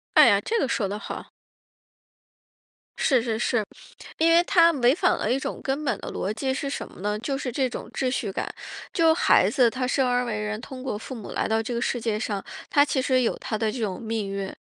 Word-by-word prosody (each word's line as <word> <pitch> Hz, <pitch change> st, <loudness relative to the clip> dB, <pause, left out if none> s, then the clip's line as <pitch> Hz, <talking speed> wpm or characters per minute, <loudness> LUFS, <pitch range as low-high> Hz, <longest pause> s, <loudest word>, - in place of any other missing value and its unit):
哎 -, -, +9 dB
呀， -, -, +4 dB
这 460 Hz, +1 st, -1 dB
个 275 Hz, -, +1 dB
说 210 Hz, -4 st, 0 dB
得 205 Hz, -, -4 dB
好。 -, -, -7 dB, 1.7 s
是 260 Hz, -5 st, +3 dB
是 225 Hz, -2 st, -2 dB
是， 235 Hz, -1 st, +1 dB, 0.5 s
因 325 Hz, +1 st, +4 dB
为 340 Hz, +1 st, +6 dB
它 335 Hz, -2 st, +5 dB
违 255 Hz, -2 st, +4 dB
反 -, -, +2 dB
了 -, -, -1 dB
一 265 Hz, -, +2 dB
种 -, -, -5 dB
根 280 Hz, +3 st, -2 dB
本 245 Hz, -7 st, 0 dB
的 -, -, -6 dB
逻 195 Hz, -, -2 dB
辑 265 Hz, +5 st, -2 dB
是 275 Hz, +1 st, -3 dB
什 -, -, -4 dB
么 -, -, -15 dB
呢？ 210 Hz, +1 st, -1 dB
就 270 Hz, +4 st, -2 dB
是 260 Hz, -3 st, -3 dB
这 260 Hz, +1 st, 0 dB
种 -, -, -7 dB
秩 260 Hz, -, 0 dB
序 225 Hz, -5 st, -2 dB
感。 -, -, -3 dB, 0.4 s
就 330 Hz, -2 st, +4 dB
孩 320 Hz, -, +4 dB
子 250 Hz, -4 st, +4 dB
他 255 Hz, +2 st, -2 dB
生 260 Hz, 0 st, +2 dB
而 245 Hz, 0 st, +2 dB
为 220 Hz, -3 st, -2 dB
人 210 Hz, 0 st, -3 dB
通 255 Hz, +2 st, -9 dB
过 255 Hz, -6 st, -3 dB
父 225 Hz, -, -8 dB
母 225 Hz, -5 st, -8 dB
来 -, -, -1 dB
到 220 Hz, 0 st, +1 dB
这 225 Hz, +2 st, -4 dB
个 235 Hz, -, -2 dB
世 245 Hz, -2 st, -1 dB
界 220 Hz, -2 st, -1 dB
上， 205 Hz, -3 st, -3 dB, 0.3 s
他 285 Hz, -, +6 dB
其 280 Hz, -2 st, 0 dB
实 255 Hz, 0 st, +2 dB
有 235 Hz, -, +1 dB
他 215 Hz, -, -3 dB
的 215 Hz, 0 st, 0 dB
这 250 Hz, -, -6 dB
种 205 Hz, -5 st, -3 dB
命 220 Hz, -2 st, -2 dB
运。 195 Hz, -1 st, -4 dB
245 Hz, 260 characters per minute, -25 LUFS, 215-270 Hz, 1.7 s, 哎